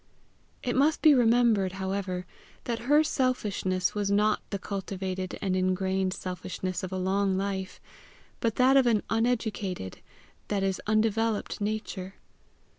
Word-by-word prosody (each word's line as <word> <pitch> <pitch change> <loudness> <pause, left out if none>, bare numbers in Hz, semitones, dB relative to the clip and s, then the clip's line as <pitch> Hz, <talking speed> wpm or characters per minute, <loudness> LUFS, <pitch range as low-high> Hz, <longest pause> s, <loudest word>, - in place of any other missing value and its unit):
It 245 - -1
must 290 +4 +2
be 310 -2 +8
remembered, 230 -6 +3
however, 190 -1 -3 0.4
that 235 -1 -2
her 300 +1 +6
selfishness 210 - 0
was 205 -1 -1
not 210 +1 +3
the 200 - -2
cultivated 190 -1 -4
and 190 -2 +1
ingrained 185 0 0
selfishness 185 0 -4
of 185 - -5
a 190 - -2
long 190 +1 +1
life, 190 -1 -3 0.6
but 230 -2 0
that 260 +2 +5
of 260 -2 +5
an 220 -3 +2
uneducated, 220 - -1 0.5
that 200 -2 -1
is 190 -1 -1
undeveloped 215 0 +1
nature. 205 -2 -3
200 Hz, 130 wpm, -28 LUFS, 185-225 Hz, 0.6 s, be